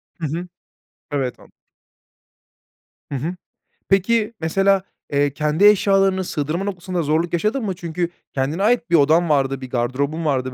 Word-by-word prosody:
Hı 165 - -5
hı. 170 +5 -4 0.6
Evet, 135 -4 -2
an - - -18 1.6
Hı - - -2
hı. 160 +8 -3 0.5
Peki, 215 +3 +2
mesela, 195 +4 +2 0.3
eee, 145 0 +2
kendi 155 +5 +1
eşyalarını 195 -2 +4
sığdırma 155 +2 -2
noktasında 185 -2 -3
zorluk 160 +4 0
yaşadın 215 +8 0
mı? 190 -3 -2
Çünkü 170 0 -3 0.2
kendine 145 +8 -1
ait 235 0 +2
bir 170 - +4
odan 160 +3 +4
vardı, 135 -2 +1
bir 130 - -7
gardırobun 135 +6 -1
vardı 130 -3 0
170 Hz, 140 wpm, -21 LUFS, 145-195 Hz, 1.6 s, eşyalarını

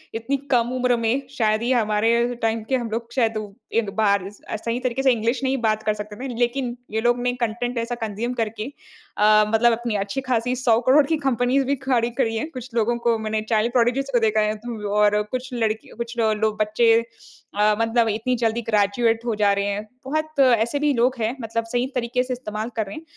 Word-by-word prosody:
इतनी 230 +5 -1 0.2
कम 240 -2 +3
उम्र 250 -1 +2
में 230 +4 0 0.2
शायद 215 -2 +2
ही 240 +2 0
हमारे 235 +1 +2
टाइम 225 0 0
के 265 - +2
हम 240 -3 -2
लोग 230 +1 -4
शायद 225 -4 +1
उ 215 -1 -4 0.3
एक 225 -3 +1
बार 200 -3 +2
स 205 - -17
अ, - - -2
सही 230 +3 -3
तरीके 255 +1 -2
से 265 - +5
इंग्लिश 235 +2 0
नहीं 265 0 +1
बात 215 -1 +1
कर 215 - +1
सकते 210 0 -7
थे 265 - -4
ना 245 - -5
लेकिन 240 0 0 0.2
ये 220 +1 -1
लोग 240 +1 +2
ने 245 0 0
कंटेंट 240 +2 -2
ऐसा 235 +1 -2
कंज़्यूम 220 +4 -3
करके 225 -3 -3 0.5
अ, 215 0 +5
मतलब 225 +2 +4
अपनी 235 -1 -2
अच्छी-खासी 245 +4 -1
100 240 -3 +3
करोड़ 280 +3 +6
की 320 - +1
कंपनीज़ 265 -1 +1
भी 280 +2 +1
खड़ी 245 -3 +1
करी 225 -4 +1
है। 225 - -1
कुछ 255 -1 -7
लोगों 235 +1 +1
को, 235 -1 +1
मैंने 215 0 -2
चाइल्ड 225 +1 +2
प्रोडिजीज़ 255 +3 +1
को 245 - +3
देखा 220 -1 +2
है। 210 0 0
तो 215 -2 -6
और 210 0 +4
कुछ 255 +1 -4
लड़की, 220 -2 -1
कुछ 235 0 -5
ल 220 -1 +3
लो 220 0 +3
बच्चे 220 +2 +3 0.6
अ, 210 +1 +3
मतलब 230 0 +2
इतनी 225 +4 0
जल्दी 230 0 +1
ग्रेजुएट 225 +2 +2
हो 235 - 0
जा 205 -1 +3
रहे 200 0 -1
हैं। 205 +1 -3 0.2
बहुत 310 +2 -3
ऐसे 240 0 +3
भी 295 0 +2
लोग 250 +1 +2
हैं 225 +3 -1
मतलब 230 0 -2
सही 245 0 +1
तरीके 250 +1 0
से 255 0 -3
इस्तेमाल 220 -2 -5
कर 220 -2 0
रहे 195 - -8
हैं। 315 - -8
230 Hz, 225 wpm, -23 LUFS, 215-250 Hz, 0.6 s, करोड़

